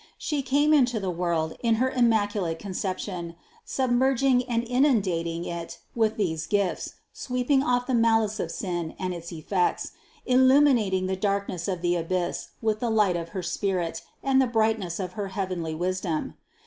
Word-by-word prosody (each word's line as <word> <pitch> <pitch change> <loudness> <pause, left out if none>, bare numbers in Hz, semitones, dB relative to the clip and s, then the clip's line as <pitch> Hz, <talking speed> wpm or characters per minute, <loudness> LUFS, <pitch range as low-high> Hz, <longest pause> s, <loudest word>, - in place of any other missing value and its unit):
She 295 -3 -2
came 285 +3 +3
into 250 -6 +3
the 190 -2 -2
world 170 -2 -1
in 230 -2 +3
her 260 +3 +1
Immaculate 205 -8 +1
Conception, 185 -2 -4 0.3
submerg 260 0 +1
ing 255 -2 +4
and 235 -1 +1
inundating 195 - +1
it 170 -1 -5 0.2
with 225 -1 +1
these 160 -6 -1
gifts, 200 -3 -1 0.2
sweeping 250 +2 0
off 245 -3 +1
the 260 - -2
malice 225 -2 +2
of 170 - -2
sin 175 -3 -4
and 185 -1 -2
its 170 0 -7
effects, 175 +3 -1 0.3
illuminating 255 -7 +4
the 190 0 -1
darkness 195 -3 -1
of 180 -3 -3
the 175 0 +2
abyss 175 +1 -2 0.2
with 215 -1 +1
the 240 - -1
light 210 -5 +3
of 170 -1 -4
her 185 +1 -5
spirit 175 -1 -2 0.2
and 270 -1 +4
the 260 - +2
brightness 220 -6 0
of 180 -2 -4
her 205 0 -3
heavenly 185 -4 -3
wisdom. 180 -1 -2
200 Hz, 160 wpm, -26 LUFS, 175-240 Hz, 0.3 s, ing